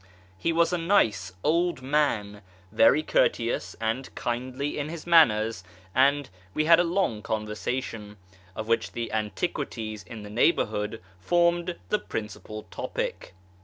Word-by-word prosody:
He 165 +13 -1
was 170 +2 +2
a 175 - +1
nice 115 - +2
old 170 -2 +1
man, 115 -8 0 0.3
very 150 +7 +5
courteous 115 -5 +1
and 115 +4 -2
kindly 130 +5 -3
in 145 +1 -3
his 165 -1 -7
manners, 115 - +4 0.3
and 140 +2 +3 0.3
we 155 - +2
had 165 +1 +7
a - - +5
long 170 - 0
conversation, 105 0 -4 0.4
of 110 - -5
which 115 0 0
the 115 -1 -4
antiquities 110 - -3
in 110 +2 -9
the 105 - -9
neighbourhood 105 - +1 0.2
formed 170 - +2
the 210 - +2
principal 105 0 -6
topic. - - -4
120 Hz, 130 wpm, -27 LUFS, 110-165 Hz, 0.4 s, had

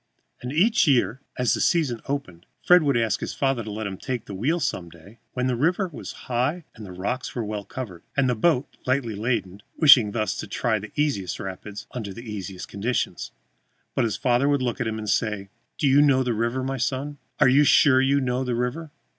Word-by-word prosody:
And 125 - -5
each 195 +7 +3
year, 130 -1 +2 0.2
as 125 -1 +2
the - - -1
season 145 -10 +1
opened, 95 -12 -5 0.2
Fred 180 0 +7
would 140 -5 +2
ask 110 -3 +1
his - - -5
father 135 -4 0
to 110 - -7
let 110 +1 -4
him 95 -2 -4
take 125 +1 -4
the 100 - -8
wheel 140 - 0
some 90 - -2
day 90 +7 -16
when 125 0 -1
the 130 -1 +1
river 175 - +1
was - - -7
high 130 +7 -1
and 110 - -11
the 95 - -9
rocks 100 +8 -4
well 105 -3 -3
covered, 100 -5 -7 0.2
and 135 -1 +3
the 125 - +2
boat 130 +4 +1
lightly 130 -3 0
laden, 105 -3 -2 0.2
wishing 135 -9 +7
thus 110 0 -1
to - - -5
try 110 -3 0
the 105 +1 -9
easiest 135 - -1
rapids 100 +1 -7
under 105 -4 -6
easiest 100 -5 -7
conditions. 110 +5 -2 0.6
But - - +1
his 105 -4 -2
father 130 +2 +2
would 140 -2 +1
look 125 +1 -2
at 120 - 0
him 110 0 -3
and 110 -1 -6
say: 105 -3 -1 0.3
"Do 145 - +1
you 140 +2 +6
know 135 -3 +4
the 125 -2 0
river, 120 +4 -1
my 135 +1 -2
son? 135 +3 -2 0.2
Are - - +6
you 135 +3 +5
sure 135 -2 +5
you 140 +1 +3
know 130 -1 -1
the 125 -2 -1
river?" 125 +7 -3
125 Hz, 215 wpm, -24 LUFS, 105-140 Hz, 0.6 s, Fred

